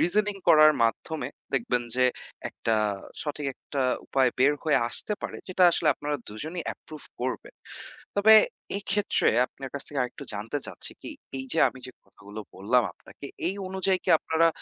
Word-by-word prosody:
reasoning 205 +2 +2
করার 155 -1 +8
মাধ্যমে 130 +3 -2 0.3
দেখবেন 125 -1 +1
যে 125 - +4 0.4
একটা, 115 -1 -1 0.5
সঠিক 150 -1 -4
একটা 140 -2 -4 0.2
উপায় 130 -2 +3
বের 135 +3 +5
হয়ে 155 -2 +3
আসতে 210 - -1
পারে - - -4
যেটা 185 0 +1
আসলে 165 -2 +1
আপনারা 145 +1 -3
দুজনেই 155 +11 -4
approve 155 -2 -12
করবেন। 130 +1 -4 0.6
তবে 220 +2 +7 0.4
এক্ষেত্রে 205 0 +1 0.2
আপনার 135 -1 -9
কাছ 140 - -3
থেকে 145 -2 -2
আরেকটু 125 +3 -6
জানতে 115 +7 -3
চাচ্ছি - - -5
কি - - -7 0.3
এই 130 - -4
যে - - 0
আমি 130 - -11
যে 125 - -10
কথাগুলো 105 +2 -11 0.2
বললাম 110 +6 +3
আপনাকে, 140 - -12 0.2
এই 190 - 0
অনুযায়ী 190 0 +1
কি - - +1
আপনারা 165 +1 +2
145 Hz, 160 wpm, -27 LUFS, 125-175 Hz, 0.6 s, করার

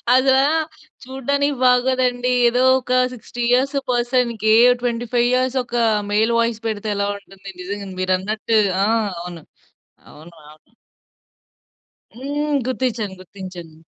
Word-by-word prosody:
అదా 265 +1 +4 0.6
చూడ్డానికి 280 +2 -1
బాగోదండి. 250 0 +2 0.2
ఏదో 245 +2 +1 0.2
ఒక 255 0 -4 0.2
60 245 0 -8
ఇయర్స్ 265 +3 +2 0.2
పర్సన్‌కి 240 -3 +1 0.3
25 240 0 0
ఇయర్స్ 255 +1 +1
ఒక 240 0 -8 0.4
మెయిల్ 220 +3 +2
వాయిస్ 230 -1 0
పెడితే 215 -1 -3
ఎలా 200 0 -1
ఉంటుంది. 195 -1 -14
నిజంగా 200 +2 -6
మీరున్నట్టు. 205 +4 0 0.3
ఆ! - - +1 0.3
అవును. 175 -2 -9 0.7
అవును. 165 +3 -15 0.2
అవును. 155 +9 -28 1.4
హ్మ్. 290 +3 -2
గుర్తిచ్చాను. 240 -6 -2
గుర్తించాను. 180 -4 -10
240 Hz, 110 wpm, -20 LUFS, 200-255 Hz, 1.4 s, అదా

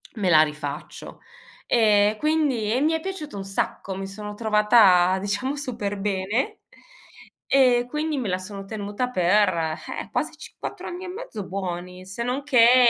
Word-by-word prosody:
me 200 -5 0
la 155 -3 +7
rifaccio". 150 -1 -4 0.5
Ehm, 210 -2 +4
quindi 295 -7 +1
e 255 - +1
mi 310 +2 +3
è 320 - 0
piaciuto 320 - -6
un 195 - -5
sacco, 195 0 -3
mi 195 0 -5
sono 210 +1 -7
trovata 210 -4 +5
diciamo 205 +8 -2
super 235 -8 -4
bene, 200 +5 -1 0.9
ehm, 250 -3 +4
quindi 300 +3 -2
me 250 -5 -2
la 185 - 0
sono 195 +1 -8
tenuta 205 +3 -3
per, 205 -1 +3 0.5
eh, - - -10
quasi - - -1
cinqu - - -13
4 - - -6
anni 360 +2 -6
e - - -6
mezzo 365 - -6
buoni, 180 -1 -5
se 190 +5 -5
non 250 +4 -2
che 245 -1 +6
210 Hz, 165 wpm, -24 LUFS, 195-255 Hz, 0.9 s, la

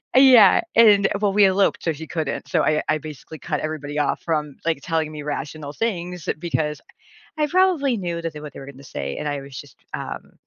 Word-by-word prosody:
Uh, - - +8
yeah. 250 -7 +7
And 210 -4 +6
well, 205 -2 +1
we 205 0 +6
eloped 195 +1 +2
so 165 - 0
he 160 +2 -8
couldn't. 160 -4 -3
So 165 - +1
I 155 0 +1
I 155 - +3
basically 155 +1 -10
cut 150 +3 -3
everybody 150 -1 -4
off 145 - 0
from, 150 -4 -2
like, 165 -3 0
telling 160 -3 -1
me 150 -1 -7
rational 145 0 -5
things 180 -5 -3
because 150 -3 -2 0.6
I 300 - +2
probably 335 -7 +2
knew 170 -3 -3
that 165 -1 -4
they 150 - -8
what 150 -2 -9
they - - -9
were 135 +1 -9
gonna 140 0 -15
say, 70 - -5
and - - -4
I 145 -1 -2
was 135 -2 -10
just, - - -13 0.2
um, - - -7
160 Hz, 220 wpm, -22 LUFS, 150-195 Hz, 0.6 s, Uh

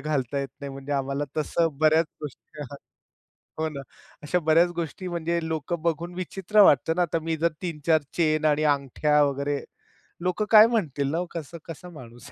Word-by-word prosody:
घालता 140 -3 -1
येत 135 - -4
नाही 140 -1 -5
म्हणजे 135 +1 -6
आम्हाला 140 +1 -1
तसं 160 0 0
बऱ्याच 155 +1 +4 0.2
गोष्टी. 150 +1 -9
हां. 140 -1 -7 0.8
हो 160 - 0
ना. 140 -3 -7 0.4
अशा 180 +5 +1
बऱ्याच 165 +2 +5
गोष्टी 170 +3 -4
म्हणजे 170 -1 -1
लोकं 160 +1 -3
बघून 170 +1 -2
विचित्र 190 +3 +1
वाटत 145 -3 +4
ना. 180 - +1
आता 165 -1 0
मी 165 0 -1
जर 170 +2 +1
3-4 160 -2 +1 0.2
चेन 155 -2 +2
आणि 155 0 +3
अंगठ्या 150 +1 +2
वगैरे 140 0 -1 0.6
लोक 180 +4 0
काय 220 0 +9
म्हणतील 145 - -1
ना 165 - -1
हो. 180 - -1
कसा 165 0 -7
कसा 170 +2 -9
माणूस 120 -7 -12
155 Hz, 175 wpm, -25 LUFS, 145-170 Hz, 0.8 s, काय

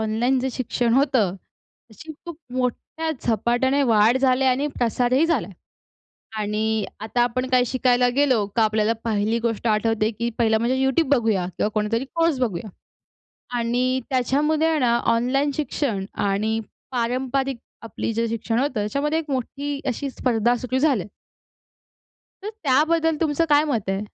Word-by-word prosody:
Online 225 +4 +1
जे 265 - -1
शिक्षण 240 -1 -1
होतं 260 -9 +2
त्याची 235 - -16
खूप 340 -3 -7 0.2
मोठ्या 255 +6 -2
झपाट्याने 245 +4 +1
वाढ 225 -1 +4
झाली 260 0 +2
आणि 265 +3 +2
प्रसारही 250 +5 +2
झाला 305 - 0
आहे 200 - -13 0.9
आणि 215 +1 -1
आता 220 +3 -1
आपण 255 +2 -1
काय 255 -1 +4
शिकायला 250 -1 +2
गेलो 260 -7 +3
का 225 - +4
आपल्याला 215 +1 +2
पहिली 220 0 0
गोष्ट 230 0 -2
आठवते 220 0 +1
की 235 +2 -3
पहिला 225 -2 +3
म्हणजे 235 +3 0
YouTube 270 +2 +1
बघूया 220 -7 +1
किंवा - - +1
कोणतातरी 220 +4 0
कोर्स 330 -4 +2
बघूया 215 -5 -2 0.9
आणि 250 +2 0
त्याच्यामध्ये 290 +5 +1
आहे 320 -1 +1
ना, 235 -3 +3
ऑनलाईन 255 +5 +1
शिक्षण 265 -9 -2 0.2
आणि 215 +3 0 0.3
पारंपरिक 255 +2 -1 0.3
आपली 225 0 -4
जे 230 +1 0
शिक्षण 230 +1 -1
होतं 275 +1 0
त्याच्यामध्ये 280 +9 -1
एक 320 -2 -8
मोठी 280 +2 -3
अशी 270 +2 -2
स्पर्धा 240 -2 +1
सुरू 250 +2 -2
झाली 275 -7 +2
आहे. 180 - -10 1.3
तर 410 - -5
त्याबद्दल 315 +3 +2
तुमचं 315 0 +1
काय 295 0 +5
मत 235 -10 -2
आहे? 195 0 0
245 Hz, 150 wpm, -23 LUFS, 225-275 Hz, 1.3 s, काय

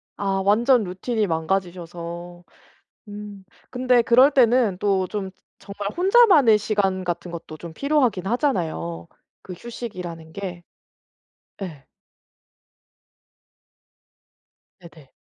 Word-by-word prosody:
아 195 -1 -1
완전 235 +4 +4
루틴이 210 +4 -2
망가지셔서. 175 0 -4 0.7
음. 205 -1 -9 0.3
근데 250 -1 +3
그럴 250 +4 +6
때는 240 -7 +3
또 195 -2 +1
좀 200 -3 -4 0.3
정말 200 0 -6
혼자만의 360 - +5
시간 200 -3 0
같은 175 0 -4
것도 165 -2 -8
좀 170 +1 -9
필요하긴 265 - +1
하잖아요 180 - -2 0.3
그 185 - -9
휴식이라는 180 -7 -8
게. 180 -3 -6 1.0
예. 155 -8 -7 2.9
네네. 165 -5 -16
195 Hz, 200 characters per minute, -23 LUFS, 175-235 Hz, 2.9 s, 그럴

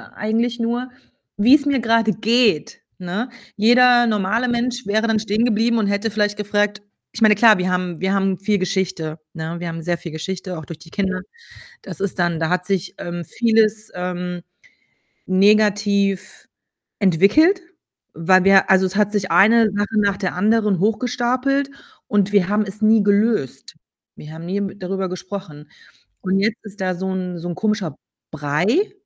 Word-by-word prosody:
eigentlich 230 +3 -1
nur, 240 +2 -2 0.5
wie‘s 275 +8 +4
mir 280 -3 +1
grade 225 -1 +2
geht, 220 -6 +1 0.2
ne? 185 +8 -4 0.3
Jeder 240 +2 +5
normale 215 +3 0
Mensch 240 0 -2
wäre 220 +3 +1
dann 225 -1 +1
stehengeblieben 225 +2 +1
und 215 - 0
hätte 200 +2 -1
vielleicht 210 0 0
gefragt 205 0 -1 0.3
ich 225 - -6
meine, 215 -1 +6
klar, 215 -1 +5
wir 180 0 -1
haben 180 -2 -2
wir 190 +1 0
haben 195 -1 0
viel 205 +1 0
Geschichte, 185 -4 -3
ne? 160 0 -6
Wir 175 - -6
haben 165 0 -6
sehr 175 +1 -2
viel 170 - -9
Geschichte, 185 +3 -5
auch 160 - -8
durch 155 +2 -10
die 165 - -16
Kinder. 190 -1 -2 0.6
Das - - -9
ist 195 -1 -3
dann 170 -2 0
da 160 - 0
hat 180 +1 -1
sich, 195 -2 -2
ähm, 175 0 -6
vieles, 220 +1 +1
ähm, 180 0 -4 0.9
negativ 200 0 +1 0.5
entwickelt, 205 - +4 0.5
weil 185 +4 +3
wir 195 0 +5
also 190 0 +5
es 185 +1 -5
hat 210 -1 +1
sich 200 -3 -2
eine 225 +3 +5
Sache 205 +2 -1
nach 200 -1 +1
der 190 -3 -3
anderen 210 +1 +1
hochgestapelt 250 +5 0 0.4
und 205 -1 +1
wir 195 -3 +3
haben 210 +1 +1
es 200 +3 -9
nie 215 0 +4
gelöst. 205 - 0 0.4
Wir 150 - -11
haben 165 +1 -9
nie, 190 +3 -2
hm, 200 0 -4
darüber 190 0 -3
gesprochen 180 -5 -8 0.5
und 190 0 0
jetzt 220 +3 -1
ist 205 -1 -12
da 185 -1 -1
so 190 +1 -3
‘n 180 -2 -4
so 175 - -6
‘n 175 - -4
komischer 210 -9 -2 0.4
Brei, 160 - 0
200 Hz, 165 wpm, -20 LUFS, 185-220 Hz, 0.9 s, meine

